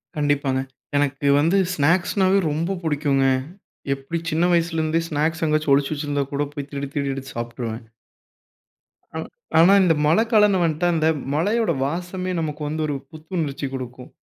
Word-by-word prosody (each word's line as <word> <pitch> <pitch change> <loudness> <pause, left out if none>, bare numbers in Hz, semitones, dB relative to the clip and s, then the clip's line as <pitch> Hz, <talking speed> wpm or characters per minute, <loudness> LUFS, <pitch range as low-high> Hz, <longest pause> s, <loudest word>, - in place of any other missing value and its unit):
கண்டிப்பாங்க. 145 -3 +1 0.4
எனக்கு 145 0 0
வந்து 165 +6 +3 0.2
ஸ்நாக்ஸ்னாவே 185 +5 +2
ரொம்ப 170 +6 -1
புடிக்குங்க. 145 -3 +1 0.7
எப்படி 135 +5 -4
சின்ன 165 +3 +2
வயசுலருந்தே 165 -1 +1
ஸ்நாக்ஸ் 160 +1 -1
எங்கேயாச்சும் 155 -2 +2
ஒளிச்சு 140 +2 0
வச்சிருந்தா 145 -1 -2
கூட, 145 - 0
போய் 145 -1 -6
திருடி 140 -1 -4
திருடி 140 -1 0
எடுத்து 135 0 -8
சாப்ட்டுருவேன். 115 -1 -5 1.3
ஆனா - - -3 0.3
ஆனா 175 +4 +7
இந்த 170 -3 +4
மழைக்காலம்ன்னு 210 +1 +4
வந்துட்டா, 165 +1 +1
அந்த 160 -1 +2 0.3
மழையோட 210 +5 +1
வாசமே 180 +4 -3
நமக்கு 150 -1 -4
வந்து 155 +1 -3
ஒரு 145 - -2 0.2
புத்துணர்ச்சி 155 -3 -4
குடுக்கும். 125 -1 -7
155 Hz, 135 wpm, -22 LUFS, 140-170 Hz, 1.3 s, ஆனா